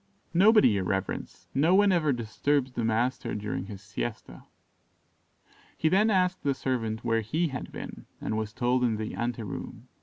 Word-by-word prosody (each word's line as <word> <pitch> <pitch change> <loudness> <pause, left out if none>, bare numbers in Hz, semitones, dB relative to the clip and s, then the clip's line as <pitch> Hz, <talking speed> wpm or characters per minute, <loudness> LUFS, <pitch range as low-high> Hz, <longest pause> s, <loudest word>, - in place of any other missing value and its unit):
"Nobody, 210 +5 +6
your 100 -3 +1
reverence; 95 +1 -3
no 155 +7 +4
one 200 0 +5
ever 160 -5 +2
disturbs 130 +3 0
the 120 - -3
master 115 +1 0
during 105 -2 -3
his 100 -1 -9
siesta." 110 +1 -6 1.3
He 160 - +2
then 210 +6 +4
asked 185 -2 +2
the 140 -1 0
servant 115 -4 -2
where 115 -1 +2
he 155 +10 0
had 130 -2 -6
been, - - -8
and 110 - -2
was 110 -1 -2
told 125 +2 +1
in 115 -3 +1
the 110 0 -4
ante 120 -1 -2
room. 105 - -7
120 Hz, 170 wpm, -28 LUFS, 110-155 Hz, 1.3 s, Nobody